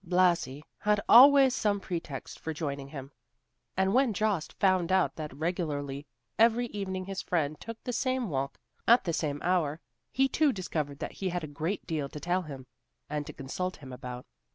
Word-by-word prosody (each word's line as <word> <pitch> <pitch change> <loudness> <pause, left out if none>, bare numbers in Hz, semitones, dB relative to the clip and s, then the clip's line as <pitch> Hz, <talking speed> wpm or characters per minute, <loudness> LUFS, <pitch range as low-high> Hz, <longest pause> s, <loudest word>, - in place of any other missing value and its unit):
Blasi 170 -6 +2 0.2
had 210 0 +2
always 270 +1 +8
some 205 -5 +1
pretext 165 -7 -6
for 160 -1 -4
joining 140 -3 -4
him, 140 -1 -8 0.7
and 190 +1 +2
when 260 -3 +3
Jost 205 -5 0
found 185 -3 +2
out 190 -1 +2
that 155 -1 -5
regularly 145 -3 -3 0.3
every 230 +2 +5
evening 190 -2 -4
his 195 0 -4
friend 155 -4 -1
took 230 0 -8
the 245 - -3
same 255 -1 0
walk 140 -4 -2 0.3
at 235 +2 +6
the 170 -3 -1
same 145 -3 -1
hour, 165 -4 +1 0.3
he 270 +1 +3
too 300 +2 +3
discovered 155 - -3
that - - -5
he 190 - -3
had 175 -1 -3
a 145 -2 -8
great 185 +6 -1
deal 155 -5 -2
to 150 - -8
tell 175 +5 0
him, 140 -6 -8 0.5
and 150 -1 -2
to - - -7
consult 180 +7 -4
him 130 -3 -10
about. 125 0 -7
175 Hz, 180 wpm, -29 LUFS, 145-200 Hz, 0.7 s, always